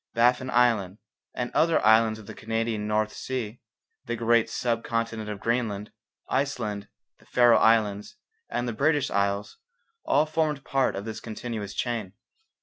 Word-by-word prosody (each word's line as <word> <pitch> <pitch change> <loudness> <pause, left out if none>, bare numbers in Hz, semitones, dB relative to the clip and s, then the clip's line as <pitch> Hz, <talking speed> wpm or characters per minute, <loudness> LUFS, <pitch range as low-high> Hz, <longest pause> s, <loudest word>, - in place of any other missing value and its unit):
Baffin 125 +2 +3
Island 115 -6 +2 0.4
and 125 -1 -3
other 165 0 +3
islands 110 0 +5
of 110 - -12
the - - -8
Canadian 115 -1 -2
North 105 0 0
Sea, 125 -3 -4 0.5
the 120 - -2
great 115 0 +2
sub 115 -2 -1
continent 115 -2 -2
of 105 -2 -5
Greenland, 110 -3 -1 0.4
Iceland, 110 -8 -2 0.3
the - - -23
Faroe 120 -1 +5
Islands, 110 - +2 0.3
and 120 - -2
the 120 - -2
British 145 +3 +1
Isles, 100 +1 -1 0.5
all 150 +2 +3
formed 155 -3 -1
part 135 -1 +1
of 100 +1 -5
this 110 -1 -5
continuous 110 -2 -6
chain. 115 -6 -2
115 Hz, 145 wpm, -26 LUFS, 105-125 Hz, 0.5 s, islands